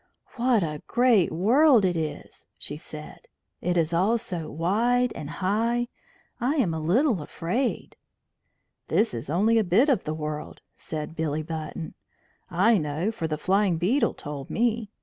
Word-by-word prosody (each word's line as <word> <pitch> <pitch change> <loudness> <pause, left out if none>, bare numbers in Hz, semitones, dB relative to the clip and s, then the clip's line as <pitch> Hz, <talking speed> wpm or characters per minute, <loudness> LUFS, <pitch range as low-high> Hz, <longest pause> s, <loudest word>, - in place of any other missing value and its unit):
"What 240 -4 +2
a 150 -2 -4
great 240 -6 +3
world 230 - +5
it 180 -1 +1
is!" 160 -2 -5
she 145 - -5
said. 150 0 -10 0.3
"It 180 0 0
is 165 0 +1
all 195 +8 +3
so 175 -7 -5
wide 235 +9 +1
and 145 - -7
high. 225 +8 0 0.5
I 260 +5 +1
am 220 - +1
a 160 - -2
little 200 - +2
afraid." 185 - -3 0.9
"This 225 - +2
is 115 +2 -5
only 215 +8 +3
a - - +2
bit 210 - +3
of 250 -9 +2
the 155 - -3
world," 150 -1 -5
said 155 +1 -6
Billy 155 -1 -1
Button. 160 0 -6 0.6
"I 195 +5 +4
know, 155 +7 -1
for 170 -8 -3
the 155 -1 -2
Flying 190 -1 +2
Beetle 210 - +1
told 145 -2 -7
me. 230 -2 0
185 Hz, 155 wpm, -26 LUFS, 160-230 Hz, 0.9 s, world